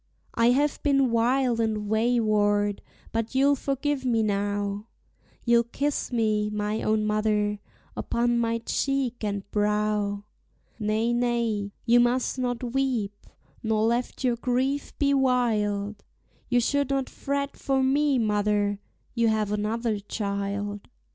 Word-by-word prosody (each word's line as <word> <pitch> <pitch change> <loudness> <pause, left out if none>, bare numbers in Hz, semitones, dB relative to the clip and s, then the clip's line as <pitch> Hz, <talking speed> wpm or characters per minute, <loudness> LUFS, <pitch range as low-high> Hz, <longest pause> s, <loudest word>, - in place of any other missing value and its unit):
I 230 0 +3
have 280 +4 +1
been 275 -4 +3
wild 240 +1 +2
and 215 -2 -1
wayward, 215 -2 +2 0.3
but 230 +2 -2
you'll 280 +2 +4
forgive 275 +1 -2
me 230 -3 +2
now; 205 0 -1 0.6
You'll 235 -1 +4
kiss 280 +5 -2
me, 215 -3 +1
my 210 +1 -2
own 215 0 +1
mother, 210 -1 +1 0.4
upon 240 0 0
my 230 0 +1
cheek 270 -4 -1
and 200 -1 -3
brow; 210 -1 0 0.6
Nay, 220 +2 0
nay, 235 -4 0
you 240 0 +5
must 245 +2 +1
not 245 -1 -2
weep, 240 -7 -1 0.3
nor 220 -1 +1
let 235 +4 -1
your 245 -2 +1
grief 260 +4 -1
be 280 -1 +2
wild; 215 -6 +1 0.5
You 245 -1 +3
should 285 +3 +1
not 275 -1 0
fret 280 0 -3
for 270 -1 0
me, 280 +1 +2
mother 205 -2 +1 0.3
you 235 -1 +2
have 215 -2 +1
another 215 +1 -1
child. 200 0 -4
230 Hz, 130 wpm, -26 LUFS, 210-250 Hz, 0.6 s, you